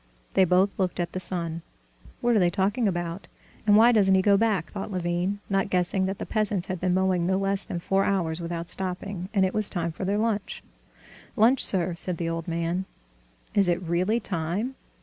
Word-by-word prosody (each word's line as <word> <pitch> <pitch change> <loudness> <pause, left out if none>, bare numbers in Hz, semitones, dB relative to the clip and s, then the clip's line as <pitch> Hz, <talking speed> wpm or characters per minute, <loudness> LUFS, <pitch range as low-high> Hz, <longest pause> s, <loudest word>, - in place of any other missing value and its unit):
They 190 - +5
both 185 +3 +2
looked 185 -2 -1
at 175 - -2
the 185 - -4
sun. 170 -3 -3 0.6
"What 240 -1 +2
are - - +5
they 175 -2 +4
talking 200 +6 0
about, 175 0 -3 0.4
and 205 0 +6
why 230 +2 +7
doesn't 195 -4 +4
he 190 - +3
go 200 0 +5
back?" 205 -5 +1
thought 195 -1 -5
Levin, 180 +2 -2
not 195 -1 0
guessing 185 +1 +1
that 195 +1 -3
the - - -5
peasants 210 -4 0
had 185 -2 -4
been 180 0 +1
mowing 185 -2 +1
no 190 0 +2
less 195 0 0
than 175 - -4
four 195 +3 +1
hours 175 -5 -1
without 170 0 -4
stopping, 185 0 -4
and 195 -3 +3
it 185 - -2
was 215 -1 +2
time 170 -3 -2
for 160 - -7
their 200 +2 0
lunch. 215 -2 -2 0.7
"Lunch, 240 +3 +4
sir," 180 -2 0
said 175 0 +1
the 165 -1 -2
old 165 0 -4
man. 170 +2 -2 0.7
"Is 195 -3 +3
it 175 0 +1
really 180 +7 +1
time? 185 +7 -2
190 Hz, 205 wpm, -26 LUFS, 175-200 Hz, 0.7 s, why